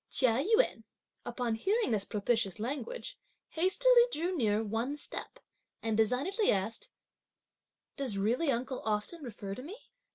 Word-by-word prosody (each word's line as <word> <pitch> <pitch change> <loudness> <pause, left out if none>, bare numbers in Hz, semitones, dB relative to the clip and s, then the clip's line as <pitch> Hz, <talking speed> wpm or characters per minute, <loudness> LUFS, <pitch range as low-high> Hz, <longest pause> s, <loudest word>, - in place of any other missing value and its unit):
Chia 255 0 +2
Yün 360 - +2 0.4
upon 240 -1 -1
hearing 400 - +1
this 205 -3 0
propitious 210 -2 0
language, 385 - -4 0.3
hastily 475 +9 +5
drew 350 +1 -1
near 220 -6 +2
one 225 +7 -2
step, - - -6 0.5
and 225 -1 0
designedly 265 - +2
asked: 205 +3 -2 1.1
"Does 255 -8 -2
really 240 +11 +1
uncle 255 +1 -1
often 215 +10 -2
refer 210 -6 -6
to 225 - -7
me?" 350 - -8
245 Hz, 130 wpm, -32 LUFS, 220-335 Hz, 1.1 s, hastily